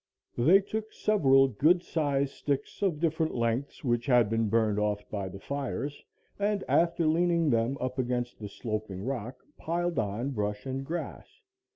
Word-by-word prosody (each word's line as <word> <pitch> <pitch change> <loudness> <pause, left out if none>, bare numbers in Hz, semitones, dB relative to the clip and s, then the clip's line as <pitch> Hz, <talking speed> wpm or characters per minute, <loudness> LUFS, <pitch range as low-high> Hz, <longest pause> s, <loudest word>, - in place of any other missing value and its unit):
They 165 +12 +5
took 220 +2 -5
several 135 -10 +4
good 155 - +3
sized 140 -3 0
sticks 140 -1 -3
of 180 -7 +1
different 160 -1 0
lengths 120 +3 -1
which 120 -3 0
had 120 -5 +4
been 115 -1 +1
burned 110 -1 +2
off 105 -1 -1
by 100 -3 -3
the 95 - -8
fires 140 +3 -4 0.4
and 205 -1 0
after 170 0 +2
leaning 165 -1 +2
them 115 +4 +1
up 130 +1 -3
against 120 -1 -2
the 105 -2 -6
sloping 105 -3 -4
rock, 125 -2 -5
piled 175 0 -1
on 110 +5 -2
brush 105 -2 -3
and 135 0 -3
grass. 175 - -6
135 Hz, 160 wpm, -29 LUFS, 115-165 Hz, 0.4 s, They